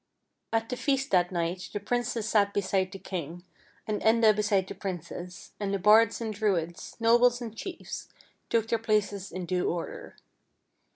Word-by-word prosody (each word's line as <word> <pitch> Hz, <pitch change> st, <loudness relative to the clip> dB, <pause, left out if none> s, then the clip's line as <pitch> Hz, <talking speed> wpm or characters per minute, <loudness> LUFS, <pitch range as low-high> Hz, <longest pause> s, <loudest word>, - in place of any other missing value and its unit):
At 225 Hz, 0 st, +1 dB
the 250 Hz, -, -3 dB
feast 275 Hz, -1 st, 0 dB
that 180 Hz, -1 st, +3 dB
night 175 Hz, +1 st, -2 dB
the 205 Hz, -, -2 dB
princess 230 Hz, 0 st, -1 dB
sat 205 Hz, -2 st, +2 dB
beside 190 Hz, -1 st, +1 dB
the 195 Hz, -, -7 dB
king, 175 Hz, -2 st, -6 dB, 0.4 s
and 215 Hz, -1 st, -2 dB
Enda 220 Hz, -1 st, +5 dB
beside 205 Hz, -2 st, +2 dB
the -, -, -7 dB
princess, 180 Hz, -1 st, -7 dB
and 200 Hz, -2 st, -2 dB
the 200 Hz, -, +1 dB
bards 215 Hz, +3 st, +5 dB
and 225 Hz, -2 st, -3 dB
Druids, 185 Hz, -6 st, -1 dB
nobles 240 Hz, +1 st, +5 dB
and 230 Hz, -3 st, -7 dB
chiefs, 355 Hz, +10 st, -7 dB, 0.4 s
took 225 Hz, -1 st, +2 dB
their 230 Hz, 0 st, +1 dB
places 205 Hz, -3 st, 0 dB
in 185 Hz, -1 st, -4 dB
due 180 Hz, 0 st, 0 dB
order. 170 Hz, -1 st, -5 dB
205 Hz, 165 wpm, -28 LUFS, 185-225 Hz, 0.4 s, Enda